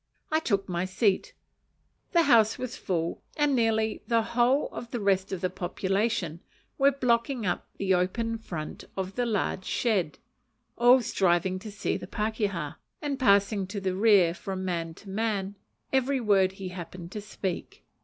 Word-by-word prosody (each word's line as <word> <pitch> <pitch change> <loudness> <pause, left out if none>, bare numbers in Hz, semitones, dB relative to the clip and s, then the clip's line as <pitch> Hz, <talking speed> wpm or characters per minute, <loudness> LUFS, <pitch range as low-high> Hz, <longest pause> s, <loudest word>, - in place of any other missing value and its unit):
I 315 - +3
took 200 -10 0
my 175 -1 -1
seat. 190 +1 0 0.8
The 340 -1 +5
house 225 -6 +5
was 255 -1 -5
full, 170 -3 -2 0.2
and 295 -2 +3
nearly 220 -2 +1
the 230 -2 +3
whole 240 +4 +2
of 235 - -7
the 240 - -3
rest 195 -2 +1
of 190 -2 -3
the 185 - +1
population 190 -1 -1 0.4
were 275 +1 +6
blocking 245 -2 +1
up 175 - -1
the 190 -1 +1
open 225 +6 0
front 170 -8 -6
of 190 0 -3
the 245 +2 -1
large 200 -3 -1
shed; 195 -10 0 0.6
all 245 +1 +6
striving 185 -2 +1
to 210 +2 -8
see 200 - -2
the - - -8
pakeha, 205 -8 -2 0.2
and 285 -2 -3
passing 200 -3 +3
to 200 +2 -4
the 190 -1 -1
rear 195 -4 +5
from 190 +1 -5
man 165 -3 -2
to 200 - -15
man 205 -1 -1 0.4
every 265 +1 +2
word 195 -5 +3
he 190 -1 -6
happened 175 -1 -8
to 210 - -5
speak. 195 -3 -5
200 Hz, 165 wpm, -28 LUFS, 185-235 Hz, 0.8 s, were